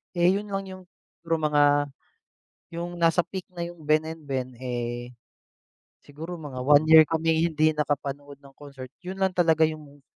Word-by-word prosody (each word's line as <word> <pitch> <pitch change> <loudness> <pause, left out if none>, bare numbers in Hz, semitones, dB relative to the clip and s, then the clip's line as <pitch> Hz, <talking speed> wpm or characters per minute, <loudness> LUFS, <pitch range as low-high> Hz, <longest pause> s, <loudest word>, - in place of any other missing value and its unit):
Eh, 175 +1 +4
'yon 205 +2 -2
lang 195 -1 -3
yung, 185 0 -10 0.4
siguro 165 0 -1 0.2
mga 145 0 +4 1.1
yung 175 +1 -5
nasa 170 +1 +3
peak 185 +2 -7
na 170 - -5
yung 170 0 -7
Ben&Ben 155 -4 -1
eh, 120 -1 -5 0.9
siguro 160 +5 -8
mga 145 -6 -8
1 145 +3 +5
year 160 0 +10
kaming 160 0 +1 0.2
hindi 155 +1 +4
nakapanood 145 -1 -3
ng 140 - -15
concert, 135 -3 -10
'yon 185 +1 -7
lang 190 -1 0
talaga 165 -3 +3
yung 150 -3 -4
155 Hz, 155 wpm, -25 LUFS, 140-170 Hz, 1.1 s, year